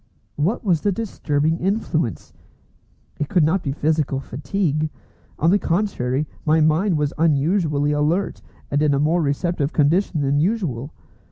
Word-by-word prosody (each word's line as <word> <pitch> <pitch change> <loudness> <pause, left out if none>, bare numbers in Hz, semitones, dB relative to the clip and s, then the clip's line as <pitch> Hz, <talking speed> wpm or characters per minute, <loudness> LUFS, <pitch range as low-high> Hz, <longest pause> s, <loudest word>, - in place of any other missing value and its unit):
What 165 +10 -1
was 170 -6 +2
the 205 - +1
disturbing 165 -7 -1
influence? 170 - -2 0.9
It 150 -1 -2
could 175 - +3
not 170 +5 +2
be 140 - -2
physical 150 -2 0
fatigue. 155 +3 -2 0.5
On 165 +3 +3
the 205 - +4
contrary, 155 -8 -1 0.2
my 155 +1 +3
mind 160 +4 +2
was 150 -1 -1
unusually 150 -1 +2
alert, 155 +6 0 0.3
and 145 +1 +1
in 150 -2 +3
a - - +1
more 160 +4 +2
receptive 150 +1 -1
condition 160 +2 +2
than 140 +1 +1
usual. 155 - -1
155 Hz, 145 wpm, -21 LUFS, 145-175 Hz, 0.9 s, the